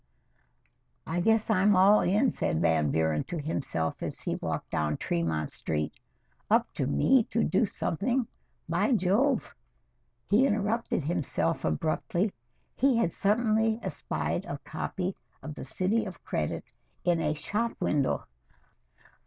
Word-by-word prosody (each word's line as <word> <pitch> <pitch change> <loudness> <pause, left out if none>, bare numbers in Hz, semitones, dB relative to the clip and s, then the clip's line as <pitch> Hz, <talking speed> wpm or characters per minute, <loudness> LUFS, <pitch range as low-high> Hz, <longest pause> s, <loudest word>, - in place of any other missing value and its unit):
"I 165 +2 -2
guess 220 +4 +2
I'm 205 0 +4
all 195 +3 +6
in," 210 +8 +3
said 80 - -1
Van 80 -3 +2
Buren 80 0 +1
to 175 - -5
himself 140 - -2
as - - -4
he - - -3
walked - - -4
down 75 -1 0
Tremont 80 -3 -1
Street. 75 -1 -2 0.6
"Up - - +3
to - - -1
me 225 - +4
to 230 - 0
do 230 - +2
something 240 +9 -1 0.4
by 275 - +2
Jove!" 225 +7 +2 0.7
he 235 +7 +4
interrupted 215 - 0
himself 135 - -1
abruptly. 170 - 0 0.4
He 265 -2 +3
had 175 -8 +1
suddenly 220 +1 +2
espied - - -3
a - - -4
copy 185 0 -3 0.3
of 155 - -6
"The - - -8
City 190 +11 0
of 190 -3 -9
Credit" 75 - -2 0.4
in 170 -2 +2
a 150 -1 0
shop 220 +9 -1
window. 145 -3 0
185 Hz, 135 wpm, -29 LUFS, 130-220 Hz, 0.7 s, all